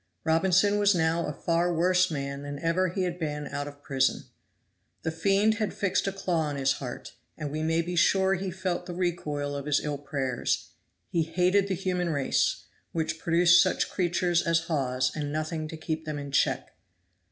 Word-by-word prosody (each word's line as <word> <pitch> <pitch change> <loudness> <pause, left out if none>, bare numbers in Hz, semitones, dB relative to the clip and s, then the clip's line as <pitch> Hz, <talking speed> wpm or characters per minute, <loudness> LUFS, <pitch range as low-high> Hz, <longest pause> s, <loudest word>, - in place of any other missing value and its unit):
Robinson 190 +5 +3
was 205 -1 +4
now 165 0 +1
a - - -2
far 170 +3 0
worse 180 +2 +3
man 140 -2 -4
than 145 0 -6
ever 170 +5 +1
he 185 +2 -2
had 180 -1 -3
been 150 -2 -3
out 145 0 -4
of 145 0 -11
prison. 135 -2 +1 0.8
The 160 - -1
fiend 200 +6 +2
had 215 -3 -1
fixed 200 0 0
a - - +1
claw 175 -5 -1
in 145 - -4
his 135 -1 +2
heart, 125 -3 -7 0.2
and 150 -3 -4
we 155 +1 -3
may 165 +1 +1
be 175 +1 -4
sure 190 +3 +4
he 190 +1 -2
felt 180 -1 -3
the 175 - -5
recoil 150 -5 -2
of 140 0 -5
his 145 -1 +3
ill 145 -2 -3
prayers. 135 -3 -2 0.4
He 170 - +2
hated 180 +5 +2
the 190 - -1
human 180 -1 -1
race, 140 -4 +1 0.3
which 160 -1 -2
produced 170 +1 +5
such 185 - +1
creatures 175 -1 +1
as 165 0 +2
Hawes 130 -6 0
and 145 -2 -3
nothing 155 +1 -3
to 160 - -7
keep 160 0 -4
them 155 -1 -3
in 140 -1 -6
check. - - 0
165 Hz, 190 wpm, -28 LUFS, 145-180 Hz, 0.8 s, produced